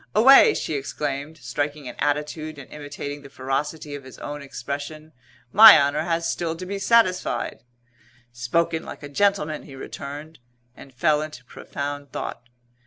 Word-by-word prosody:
"Away!" 270 - +8
she - - -3
exclaimed, 145 +2 -4
striking 145 +2 -4
an - - -6
attitude 150 +1 -2
and 140 - -10
imitating 145 -1 -7
the 140 - -13
ferocity 145 +4 -3
of 145 -1 -7
his 130 - -12
own 145 0 -6
expression, 145 +3 -6 0.4
"My 220 +1 +11
honour 145 +2 +1
has 165 0 -1
still 165 -1 -2
to 185 +3 -7
be 200 +2 -4
satisfied!" 185 - +1 0.7
"Spoken 160 +7 0
like - - -10
a 145 - -7
gentleman!" 160 -2 +1
he 140 - -12
returned, 145 +4 -8 0.4
and 135 - -13
fell 150 +4 +2
into 155 -5 -8
profound 145 +2 -6
thought. 120 0 -6
150 Hz, 150 wpm, -24 LUFS, 140-160 Hz, 0.7 s, My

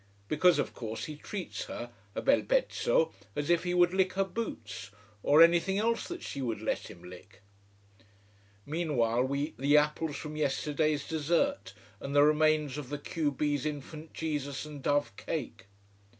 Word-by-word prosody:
Because 175 - +4
of - - -1
course 110 -1 -5
he 155 -2 -6
treats 185 +5 -5
her 120 0 -6 0.2
a - - -3
bel 275 +1 +4
pezzo - - +1 0.2
as 145 +3 0
if 170 0 +3
he 180 0 0
would 175 0 +4
lick 190 -1 +2
her 195 - +2
boots, 115 - -5 0.3
or 150 +8 +7
anything 175 +3 +4
else 230 +2 0
that 350 -1 -6
she 140 - -5
would 115 -4 -2
let - - -2
him 85 - -12
lick. 90 +3 -13 1.2
Meanwhile 140 -7 +1
we 140 +1 -1
eat 145 -6 -3
the 145 +2 +5
apples 150 0 +1
from 150 0 -6
yesterday's 150 0 0
dessert, 165 - 0 0.2
and 140 +1 -5
the 145 - +7
remains 150 -2 +3
of 135 -4 -7
the 145 - -3
q 150 0 -1
b's 145 0 -1
Infant 155 +1 -5
Jesus 145 -3 -3
and 150 -2 -9
dove 145 +1 +1
cake. 130 -10 -5
150 Hz, 165 wpm, -30 LUFS, 140-170 Hz, 1.2 s, or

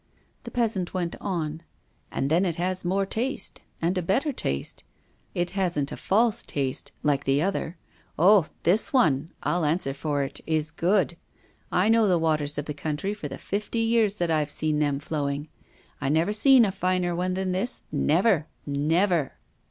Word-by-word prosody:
The - - -5
peasant 210 -7 -1
went 175 -2 -2
on: 160 -5 -3 0.5
"And 135 +2 -1
then 170 +4 +4
it 175 -4 0
has 185 +2 -2
more 195 +2 +1
taste 245 +8 -2 0.2
and 170 +3 0
a 185 - 0
better 255 - +1
taste; 70 - -3 0.5
it 175 0 -1
hasn't 175 -7 -1
a - - -4
false 225 +3 +2
taste, 135 -3 -3
like 140 -2 +1
the 135 +3 +2
other. 185 -3 -2 0.4
Oh! 185 0 +6 0.2
this 210 - +3
one, 160 - +2
I'll 175 -1 +1
answer 150 -2 0
for 145 0 -1
it, 135 - -6
is 155 -1 0
good! 175 +1 +1 0.5
I 180 +3 +3
know 225 -1 +4
the 180 -2 +3
waters 155 -3 0
of 145 - -2
the 150 - -4
country 150 +6 -3
for 210 - -6
the - - -7
fifty 205 +3 -3
years 225 -2 +2
that 175 -4 -1
I've 155 -2 +1
seen 150 +1 -1
them 145 -2 +1
flowing. 145 0 -3 0.5
I - - 0
never 165 +7 +2
seen 250 +2 +6
a 195 - 0
finer 180 -2 0
one 180 +1 -1
than 190 0 -1
this, 190 +7 -2
never, 160 +3 +2 0.2
never!" 155 +2 +1
175 Hz, 175 wpm, -26 LUFS, 150-195 Hz, 0.5 s, Oh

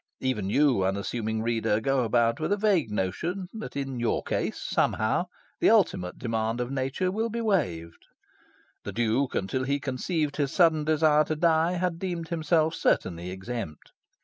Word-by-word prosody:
Even 105 -7 -1
you, 135 -4 +3
unassuming 110 +3 -2
reader, 115 -2 +1
go 135 +2 +1
about 115 0 +2
with 155 - -2
a 205 - +3
vague 195 - +2
notion 160 - -2
that 220 -1 -7
in 135 -3 -3
your 120 - 0
case, - - -2
somehow, - - 0 0.3
the - - +4
ultimate 90 0 +2
demand 115 0 -2
of 125 +1 -2
nature 135 +7 -1
will 220 +4 -1
be 235 +1 -3
waived. 90 - -1 0.8
The - - -6
Duke, 120 +4 0
until 100 +7 -1
he 140 +2 0
conceived 145 +3 -2
his 140 -2 0
sudden 160 -4 +3
desire 155 -1 +4
to 155 - -2
die, 165 +1 +2
had 180 -2 -1
deemed 175 -3 -4
himself 160 -1 +1
certainly 85 - 0
exempt. 95 -3 -6
135 Hz, 160 wpm, -27 LUFS, 110-165 Hz, 0.8 s, the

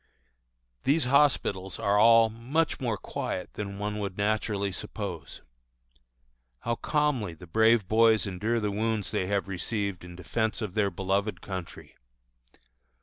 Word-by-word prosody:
These 140 +1 +2
hospitals 125 -9 +2
are 100 0 +1
all 115 +1 +7
much 130 +9 -1
more 120 -6 -1
quiet 90 - -5
than 100 -1 -5
one 105 +1 -3
would 100 -2 -4
naturally 105 -1 0
suppose. 90 - -6 1.2
How 120 - -1
calmly 130 - 0
the 85 - -12
brave 110 +3 +3
boys 110 +1 +4
endure 105 +5 -1
the 105 -2 -1
wounds 110 0 -1
they 95 - -1
have 100 -1 0
received 100 0 -3
in 90 0 -10
defence 110 +5 -1
of 105 -5 -4
their 105 -2 +2
beloved 95 +3 -1
country! 95 -3 -8
105 Hz, 135 wpm, -28 LUFS, 95-115 Hz, 1.2 s, all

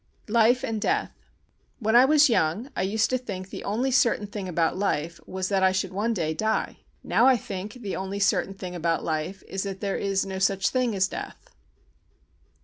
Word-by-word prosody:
Life 235 +2 +4
and 220 -2 -2
Death 415 - 0 0.7
When 220 -2 0
I 245 +2 +8
was 300 +1 +6
young 225 - 0
I - - -1
used 210 +5 +1
to 255 - +1
think 190 -6 -7
the - - -7
only 240 +6 -1
certain 235 -4 +3
thing 200 -2 -6
about 165 -1 +1
life 170 -4 -1
was 190 0 -3
that 195 -1 +1
I 190 0 +5
should 190 0 -2
one 210 +4 0
day 165 -7 -1
die. 220 +6 -1 0.3
Now 245 - +3
I 260 -2 +6
think 200 -1 -6
the 225 -6 -5
only 190 +1 -4
certain 195 -1 +1
thing 185 -2 -7
about 165 -1 -1
life 160 +4 -3
is 195 - -3
that 195 -1 -5
there 200 -2 -2
is 195 -1 0
no 190 -1 -5
such 195 +1 +2
thing 250 -4 0
as 190 -1 +2
death. - - -8
195 Hz, 200 wpm, -26 LUFS, 185-230 Hz, 0.7 s, I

